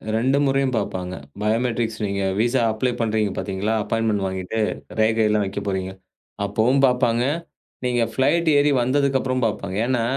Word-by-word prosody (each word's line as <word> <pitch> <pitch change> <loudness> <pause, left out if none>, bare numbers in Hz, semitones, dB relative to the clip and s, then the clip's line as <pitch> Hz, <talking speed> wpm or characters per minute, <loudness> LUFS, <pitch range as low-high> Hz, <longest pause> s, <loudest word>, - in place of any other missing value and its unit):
2 130 +5 +2
முறையும் 135 -1 +1
பார்ப்பாங்க. 90 -3 -3 0.3
பயோமெட்ரிக்ஸ் 115 +1 0
நீங்க 100 -1 -2 0.2
விசா 120 +2 +2
அப்ளை 115 +3 0
பண்றீங்க 110 -2 0
பாத்தீங்களா, 100 +2 -2
அப்பாய்ண்ட்மென்ட் 110 -3 0
வாங்கிட்டு 95 +3 -4 0.4
ரேகை 110 0 +3
எல்லாம் 105 -1 +2
வெக்கப்போறீங்க. 95 -1 -3 0.5
அப்பவும் 110 +7 +2
பார்ப்பாங்க. 125 -2 +2 0.6
நீங்க 120 -1 +1
பிளைட் 160 +6 +2
ஏறி 145 +1 +4
வந்ததுக்கு 135 +2 +2
அப்புறம் 130 -1 -1
பார்ப்பாங்க. 100 -3 -3
ஏன்னா, 125 -2 +1
115 Hz, 135 wpm, -22 LUFS, 100-130 Hz, 0.6 s, ஏறி